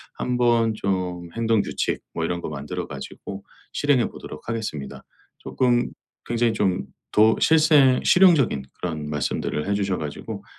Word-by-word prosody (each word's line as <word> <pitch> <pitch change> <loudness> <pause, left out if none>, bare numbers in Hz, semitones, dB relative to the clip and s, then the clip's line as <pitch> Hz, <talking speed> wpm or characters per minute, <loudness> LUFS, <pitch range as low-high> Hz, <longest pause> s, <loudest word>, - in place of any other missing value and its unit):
한번 120 -2 +2
좀 90 -4 -2
행동 115 -2 +2
규칙 - - -2
뭐 80 - -2
이런 85 +1 -2
거 - - -5
만들어 70 -1 -5
가지고 100 0 -8 0.3
실행해 140 -5 +2
보도록 75 +8 -10
하겠습니다. 90 -12 -5 0.4
쪼끔 120 -1 +1 0.4
굉장히 120 -1 +1
좀 95 -4 0 0.3
더 110 +1 +5
실생 155 -5 +5
실용적인 165 - +5 0.2
그런 80 -4 -4
말씀들을 75 +1 -2
해 100 - +1
주셔 100 -2 0
가지고 75 -2 -6
105 Hz, 300 characters per minute, -23 LUFS, 85-120 Hz, 0.4 s, 더